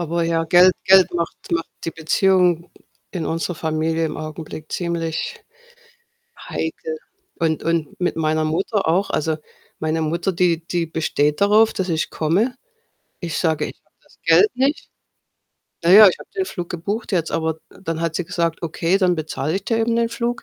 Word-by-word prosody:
Aber 170 0 -1
ja, 165 0 +1
Geld 180 +3 +6
Geld 190 -1 +6
macht 170 -1 -2
macht 165 -1 -1
die 165 - -2
Beziehung 175 +1 +2 0.4
in 175 -4 -3
unserer 165 +2 -2
Familie 160 +1 -1
im 150 - -3
Augenblick 155 0 -8
ziemlich 170 -2 -3 1.1
heikel. 470 -1 -4 0.4
Und 160 -2 0
Und 165 -2 -1
mit 180 - 0
meiner 155 -1 +1
Mutter 190 +6 -1
auch. 185 +5 +1
Also, 155 +1 0 0.4
meine 160 +1 -1
Mutter, 170 +4 -1
die 170 -2 +1
die 170 -1 -1
besteht 150 -1 0
darauf, 215 +2 +5
dass 190 -3 -3
ich 160 -2 -1
komme. 200 - 0 0.6
Ich 170 -3 -3
sage: 160 -3 +1
„Ich - - -11
habe - - -41
das - - -25
Geld 425 - +5
nicht.“ 270 +4 0 0.9
Na 170 - +3
ja, 210 0 +10
ich 180 - -2
habe - - -13
den 380 - +1
Flug 175 - -6
gebucht 200 +6 -4
jetzt, 165 -3 0
aber 160 -1 -1
dann 165 -4 -5
hat 165 -1 -1
sie 180 - -2
gesagt: 165 0 -1
„Okay, 170 +3 0
dann 180 -2 +3
bezahle 155 0 -3
ich 195 - -3
dir 225 0 0
eben 230 +1 +1
den 235 0 +2
Flug.“ 235 +1 -3
170 Hz, 175 wpm, -21 LUFS, 160-190 Hz, 1.1 s, ja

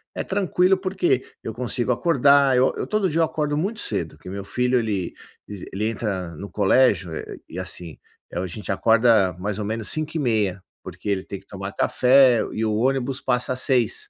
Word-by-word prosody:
é - - -2
tranquilo 190 -1 +2
porque 185 -8 0 0.2
eu 110 - -5
consigo 120 +1 -2
acordar, 140 -1 +4
eu 130 +1 +3
eu - - -3
todo 215 -3 +1
dia 160 +1 -1
eu - - +5
acordo 150 -2 -2
muito 200 +8 -2
cedo, 80 -3 -3
que 80 - -11
meu 100 +1 -5
filho 125 +3 +1
ele, 100 -6 -2 0.3
ese 100 -3 -8
ele 105 +3 -1
entra 95 -7 -3
no 100 +6 -8
colégio 100 -3 +3 0.4
e, 90 - -7
assim, 90 -3 -7 0.3
eh, - - -3
o - - -2
a - - -3
gente 100 +4 -6
acorda 110 -2 +4
mais 100 +3 -3
ou 105 - -3
menos 110 +1 -3
05:30, 115 - -1 0.2
porque - - -9
ele 95 -2 0
tem 100 - -7
que 95 - -23
tomar 100 0 -7
café 125 -1 +4
e 110 - -1
o 110 - 0
ônibus 130 +2 0
passa 125 -1 0
às 130 - -4
06:00 125 -5 0
115 Hz, 195 wpm, -23 LUFS, 100-135 Hz, 0.4 s, eu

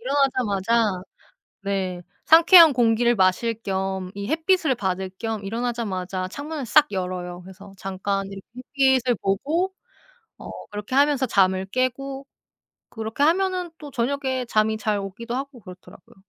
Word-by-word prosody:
일어나자마자 230 -7 +1 0.6
네. 190 -3 -2 0.2
상쾌한 330 0 +8
공기를 240 -1 +2
마실 190 +4 +2
겸 190 -1 -3
이 200 0 -6
햇빛을 325 -2 +1
받을 190 -3 -3
겸 220 -3 -4
일어나자마자 195 -5 -3
창문을 290 +3 -6
싹 295 +4 +4
열어요. 180 -1 -4
그래서 190 +2 -13
잠깐 195 +1 -3
이렇게 195 0 -10 0.5
햇빛을 250 -1 0
보고 305 - 0 0.7
어 - - -10 0.2
그렇게 210 +5 -5
하면서 280 -1 +3
잠을 190 -4 +2
깨고 270 +4 -3 0.6
그렇게 225 +4 -3
하면은 365 +2 +1
또 295 -2 -10
저녁에 260 0 -2
잠이 220 -1 +1
잘 215 -1 -1
오기도 230 +5 -6
하고 270 -1 -6
그렇더라고요. 185 -2 -15
225 Hz, 310 characters per minute, -23 LUFS, 195-275 Hz, 0.7 s, 상쾌한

